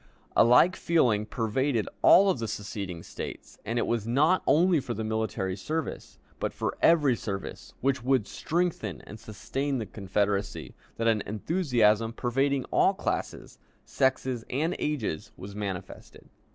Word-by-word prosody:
A - - +7
like 125 +10 +5
feeling 120 -11 +2
pervaded 115 +1 0
all 195 0 +7
of 135 - -3
the 115 - -3
seceding 100 -5 -5
States, - - -8
and 115 - -3
it - - +1
was 115 -2 -1
not 150 +10 +3
only 175 +1 +4
for 120 -3 -4
the 110 - -3
military 110 -4 -2
service, 155 +11 -5 0.2
but - - -2
for - - -2
every 150 -7 +5
service 100 -4 -6
which 135 0 +1
would 130 -4 +2
strengthen 160 - -2
and 110 - -11
sustain 135 +7 -3
the 115 - -3
Confederacy, 100 0 -2 0.2
that 115 - 0
an 110 -2 +3
enthusiasm 115 - +1
pervading 135 +3 0
all - - +3
classes, - - -4 0.3
sexes, 130 -3 0
and 160 +7 -1
ages 125 - -3
was 100 +1 -9
manifested. 100 -3 -7
115 Hz, 145 wpm, -28 LUFS, 105-140 Hz, 0.3 s, A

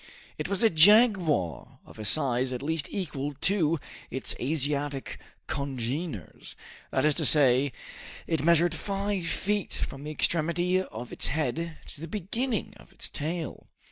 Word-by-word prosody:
It - - -2
was 200 +2 +1
a 225 - +5
jaguar 165 - +4
of - - -15
a 110 - -5
size 130 0 +2
at 125 +1 -4
least 155 -1 -1
equal 145 -7 -3
to 165 -5 +2 0.3
its 130 - +2
Asiatic 145 0 -2 0.3
congeners, 135 - -4 0.3
that - - +1
is 150 - +4
to 160 - -2
say, 135 -2 +5 0.5
it 160 -3 -1
measured 170 +1 +4
five 195 +1 -2
feet 205 +2 -1
from 135 +1 -4
the 150 - -5
extremity 170 +4 +1
of 120 -9 -8
its - - -1
head 160 +2 -2
to 145 - -10
the 165 - -5
beginning 215 - -2
of - - -18
its - - -6
tail. 160 +1 -4
155 Hz, 145 wpm, -28 LUFS, 140-180 Hz, 0.5 s, a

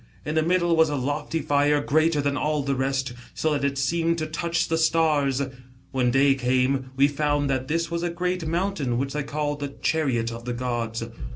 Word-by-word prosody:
In 150 - -2
the 160 - +3
middle 170 +1 +2
was 160 -1 +4
a 145 - -1
loicy 145 +4 -2
fire, 145 +1 +3
greater 155 +1 +2
than 140 0 0
all 150 0 0
the 140 0 0
rest, 130 -1 -1 0.2
so 155 -1 0
that 145 - -1
it 140 0 0
seemed 165 +4 +1
to 155 - -2
touch 165 +2 -1
the 165 0 0
stars. 150 -4 +2 0.5
When 125 -2 +1
day 135 +2 +4
came, 130 0 +1
we 140 +1 +6
found 145 -1 0
that 130 -1 -1
this 165 +3 -1
was 170 0 -1
a 175 - -1
great 180 0 -2
mountain 165 -7 -1
which 135 +1 -2
they 150 - -1
call 145 +1 -2
the 140 -1 -6
Chariot 130 -8 +1
of 115 0 -8
the 125 - -2
gods. 120 -2 -2
145 Hz, 205 wpm, -25 LUFS, 135-160 Hz, 0.5 s, we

